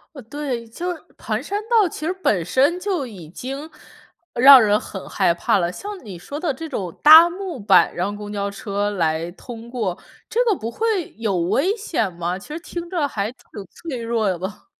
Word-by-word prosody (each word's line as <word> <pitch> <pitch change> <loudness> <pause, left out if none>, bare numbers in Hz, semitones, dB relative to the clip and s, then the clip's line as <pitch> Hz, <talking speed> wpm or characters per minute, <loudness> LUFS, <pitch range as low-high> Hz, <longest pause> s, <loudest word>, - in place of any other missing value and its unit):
呃， - - -8
对， 250 -1 -4
就 345 +11 -4
是 335 - -9 0.2
盘 215 0 -3
山 405 +9 -3
道 445 -5 +4
其 310 - -7
实 350 - 0
本 210 - 0
身 280 - +2
就 360 -9 -1
已 180 -9 -11
经 275 - -7 0.6
让 265 +2 +9
人 210 -2 +3
很 190 - -8
害 - - +2
怕 170 +3 +1
了， 175 -2 0
像 400 - -8
你 190 -5 -8
说 285 +11 -7
的 330 -5 0
这 320 +5 -7
种 190 - -4
搭 320 +3 +9
木 365 -6 -6
板， 200 -2 +4
让 200 +4 -2
公 205 0 -7
交 200 -1 -2
车 200 +1 -2
来 165 -3 -1
通 230 +4 -10
过， 215 -8 -2 0.3
这 485 +2 +1
个 415 -5 +3
不 225 - -5
会 420 - -1
有 215 -4 -1
危 275 - +1
险 340 - -2
吗？ 175 +1 -3
其 195 - -12
实 305 +2 -5
听 340 +1 -7
着 330 -6 0
还 210 -4 -3
挺 250 - -20 0.3
脆 275 -9 -6
弱 230 -1 0
的 185 - 0
吧。 190 +4 -7
235 Hz, 220 characters per minute, -21 LUFS, 200-330 Hz, 0.6 s, 让